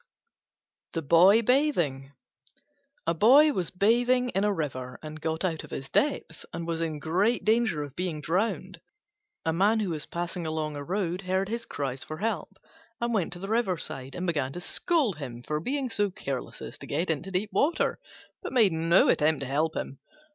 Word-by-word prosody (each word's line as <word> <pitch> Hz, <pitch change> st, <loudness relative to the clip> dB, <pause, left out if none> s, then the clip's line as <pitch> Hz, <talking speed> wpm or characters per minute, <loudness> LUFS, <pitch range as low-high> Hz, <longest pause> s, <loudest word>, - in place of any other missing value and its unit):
THE 165 Hz, -, -2 dB
BOY 185 Hz, +10 st, +6 dB
BATHING 175 Hz, -, +1 dB, 0.9 s
A 165 Hz, -, +2 dB
Boy 275 Hz, -, +6 dB
was 180 Hz, -7 st, -2 dB
bathing 245 Hz, +6 st, +2 dB
in 195 Hz, -3 st, 0 dB
a 210 Hz, -, +3 dB
river 130 Hz, -8 st, -4 dB
and 155 Hz, 0 st, -8 dB
got 160 Hz, +3 st, -1 dB
out 165 Hz, -4 st, -2 dB
of -, -, -11 dB
his 135 Hz, 0 st, -6 dB
depth, 275 Hz, -, 0 dB
and 170 Hz, 0 st, -5 dB
was 165 Hz, -1 st, -2 dB
in 160 Hz, -2 st, -2 dB
great 185 Hz, +10 st, +1 dB
danger 215 Hz, -8 st, +2 dB
of 145 Hz, -1 st, -9 dB
being 175 Hz, -4 st, -2 dB
drowned. 185 Hz, +2 st, -1 dB, 0.6 s
A 160 Hz, -, +1 dB
man 205 Hz, +6 st, +3 dB
who 200 Hz, -5 st, -1 dB
was 155 Hz, 0 st, -4 dB
passing 170 Hz, 0 st, -4 dB
along 155 Hz, -1 st, -2 dB
a 145 Hz, -, -5 dB
road 180 Hz, +1 st, -2 dB
heard 190 Hz, +1 st, -1 dB
his 230 Hz, +1 st, -4 dB
cries 135 Hz, -2 st, -4 dB
for 155 Hz, -, -7 dB
help, 205 Hz, -5 st, -3 dB, 0.4 s
and 235 Hz, 0 st, -1 dB
went 195 Hz, -7 st, 0 dB
to 175 Hz, -, -9 dB
the 195 Hz, -, -6 dB
riverside 180 Hz, -, -1 dB
and 180 Hz, -, -3 dB
began 145 Hz, -7 st, 0 dB
to -, -, -5 dB
scold 255 Hz, -, +1 dB
him 125 Hz, -5 st, -6 dB
for 150 Hz, +5 st, -3 dB
being 270 Hz, -, -1 dB
so 205 Hz, -4 st, +1 dB
careless 135 Hz, -8 st, -5 dB
as -, -, -8 dB
to -, -, -9 dB
get 165 Hz, +4 st, 0 dB
into 160 Hz, +5 st, -3 dB
deep 195 Hz, +3 st, -1 dB
water, 320 Hz, +5 st, +1 dB, 0.4 s
but -, -, -5 dB
made 225 Hz, -7 st, +5 dB
no 165 Hz, +3 st, +4 dB
attempt 150 Hz, -1 st, +3 dB
to -, -, -2 dB
help 150 Hz, +5 st, 0 dB
him. 135 Hz, -, -5 dB
175 Hz, 190 wpm, -28 LUFS, 155-210 Hz, 0.9 s, BOY